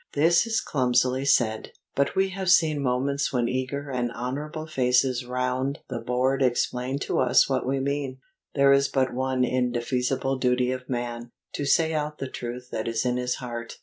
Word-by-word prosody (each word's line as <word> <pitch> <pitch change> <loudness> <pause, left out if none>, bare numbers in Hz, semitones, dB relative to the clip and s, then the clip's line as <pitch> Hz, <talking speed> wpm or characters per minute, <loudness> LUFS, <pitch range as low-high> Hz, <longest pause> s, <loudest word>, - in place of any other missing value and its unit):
This 165 +7 +3
is 225 -1 +1
clumsily 130 0 +1
said: 110 -5 +1 0.2
but 140 - +1
we 190 0 +2
have 190 -1 -3
seen 155 -5 +4
moments 140 +2 0
when 120 -2 +1
eager 130 +3 -3
and 120 -2 -1
honourable 145 +6 -4
faces 125 -3 +1
round 125 +2 -1
the 125 -3 -3
board 125 +3 0
explained 125 +1 0
to - - -1
us 125 - +4
what 130 -2 -1
we 135 +1 0
mean. 140 -1 -2 0.4
There 140 -1 +5
is 140 0 +3
but 130 -1 0
one 130 0 0
indefeasible 125 +1 0
duty 125 0 +2
of 130 0 -6
man, 120 -1 -4 0.2
to 145 - -3
say 160 +3 +3
out 150 0 -2
the 135 - -4
truth 125 +1 -6
that 110 - -3
is 115 +1 -1
in 125 0 +1
his 125 0 -1
heart. 120 -2 -7
130 Hz, 180 wpm, -26 LUFS, 125-140 Hz, 0.4 s, There